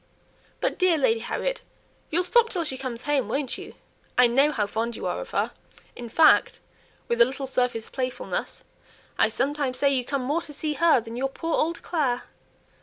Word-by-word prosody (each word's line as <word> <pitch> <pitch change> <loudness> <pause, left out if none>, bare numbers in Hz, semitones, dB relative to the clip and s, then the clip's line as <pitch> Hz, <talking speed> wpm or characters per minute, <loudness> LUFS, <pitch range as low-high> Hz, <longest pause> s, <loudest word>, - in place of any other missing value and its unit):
But, - - -1
dear 365 -3 +4
Lady 230 -5 +2
Harriet, - - -3 0.5
you'll 345 +3 +1
stop 460 +5 +4
till 360 -6 -1
she 285 -4 -3
comes 255 -3 -5
home, 285 -6 +1
won't 270 +1 -2
you? - - -10 0.4
I 250 - +7
know 270 +5 +4
how 215 -8 0
fond 225 +3 -3
you - - -6
are - - -2
of - - -8
her; - - 0 0.4
in 240 -1 -8
fact" 310 +6 +5 0.5
(with 235 0 +1
a - - +9
little 270 +2 -4
surface 250 -3 -1
playfulness) 255 -1 -4 0.6
"I - - +5
sometimes 280 -2 -1
say 280 -1 +3
you 255 -2 +1
come 275 +1 -2
more 295 +6 0
to 300 - -9
see 305 +1 -2
her 330 -3 +4
than 225 +1 -8
your 270 +2 -1
poor 325 +4 -4
old 335 +2 0
Clare." 270 -8 0
270 Hz, 190 wpm, -25 LUFS, 245-315 Hz, 0.6 s, a